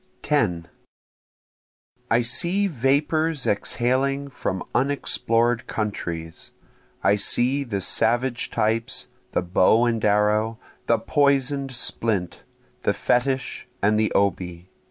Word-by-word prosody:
10 90 - 0 1.4
I 115 +2 +3
see 175 +12 +1
vapors 150 0 +1
exhaling 135 +6 0
from 95 -6 -3
unexplored 120 -3 +1
countries, 85 -6 -4 0.5
I 100 +1 +4
see 125 +7 +1
the 105 -7 -3
savage 120 +6 0
types, 115 +2 -1 0.3
the - - +1
bow 95 +6 +4
and 115 -2 0
arrow, 105 +2 +2 0.3
the 115 - +4
poison'd 140 +2 +1
splint, 110 -6 -1 0.4
the - - +1
fetich, 130 +1 -1 0.2
and 105 +1 +3
the 110 - +1
obi. 90 -2 -1
115 Hz, 100 wpm, -24 LUFS, 105-135 Hz, 1.4 s, I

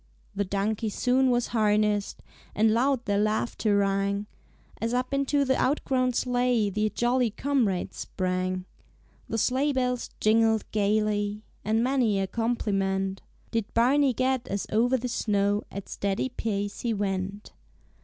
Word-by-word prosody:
The 200 0 0
donkey 205 +3 -1
soon 255 +4 +2
was 245 -1 +1
harnessed, 210 -2 +1 0.3
And 215 +1 +3
loud 255 +1 +1
their 205 -1 +1
laughter 215 0 +1
rang, 200 +1 0 0.6
As 230 +2 0
up 255 +2 -1
into 275 +1 +1
the 265 0 +2
outgrown 255 -2 +1
sleigh 245 -4 +1
The 215 +2 0
jolly 240 +3 +1
comrades 225 -5 -1
sprang. 185 0 -2 0.6
The 225 - -1
sleigh 265 +6 +1
bells 250 -2 -1
jingled 220 0 +3
gayly, 210 0 0 0.2
And 220 +2 +1
many 245 -6 +2
a 195 - +1
compliment 195 -3 -1 0.3
Did 225 -3 -2
Barney 260 +3 +4
get 255 0 0
as 200 0 -2
o'er 245 +4 +3
the 250 +1 -3
snow 205 -3 +1
At 200 0 -7
steady 200 +6 -2
pace 205 -4 -3
he 230 -2 -1
went. 195 0 -3
220 Hz, 135 wpm, -27 LUFS, 200-250 Hz, 0.6 s, Barney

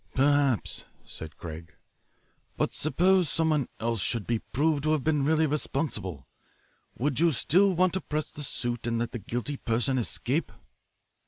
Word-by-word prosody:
"Perhaps," 140 - +2 0.2
said 80 0 -7
Craig. 80 +1 -8 0.8
"But - - 0
suppose 180 +2 +3
someone 155 -5 +1
else 115 -2 -1
should 115 0 0
be 115 -1 0
proved 150 +4 0
to 155 +2 +2
have 150 -4 0
been 150 -3 +2
really 160 +2 +3
responsible? 135 - -2 0.7
Would 140 +2 0
you 170 0 +5
still 185 +8 +3
want 185 0 +3
to 190 - -1
press 155 0 -3
the 150 - -8
suit 120 -4 -3
and 115 -1 0
let 115 0 -1
the 120 - -4
guilty 120 +7 -3
person 125 +3 +1
escape?" 130 +6 -1
140 Hz, 155 wpm, -28 LUFS, 115-155 Hz, 0.8 s, you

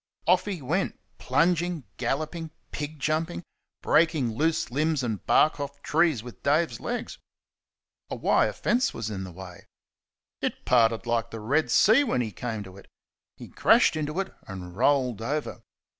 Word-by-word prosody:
Off 180 +1 +3
he 190 -8 -4
went, 170 +9 -1 0.2
plunging, 175 -2 +1
galloping, 155 +6 -2 0.2
pig 150 +1 -5
jumping, 160 +4 -1 0.4
breaking 155 -7 +3
loose 155 +3 0
limbs 150 +1 0
and 110 -5 -3
bark 155 -1 +4
off 140 0 -5
trees 155 -7 +2
with 120 -1 -11
Dave's 155 +4 +1
legs. 245 0 -4 0.9
A - - -3
wire - - +2
fence 255 +3 0
was 110 -1 -4
in 95 -2 -4
his 90 -2 -10
way. 90 -1 -11 0.7
It - - -3
parted 115 -2 +3
like 115 -1 0
the 115 - -7
Red 140 +9 +1
Sea 230 +7 +5
when 130 - 0
he 110 -3 -3
came 110 +1 -4
to 95 -1 -12
it 100 - -15 0.5
he - - -10
crashed - - +4
into 155 +3 -2
it 195 0 -3
and 90 -2 -8
rolled 125 -3 +2
over. 145 +6 -3
145 Hz, 160 wpm, -26 LUFS, 115-165 Hz, 0.9 s, Sea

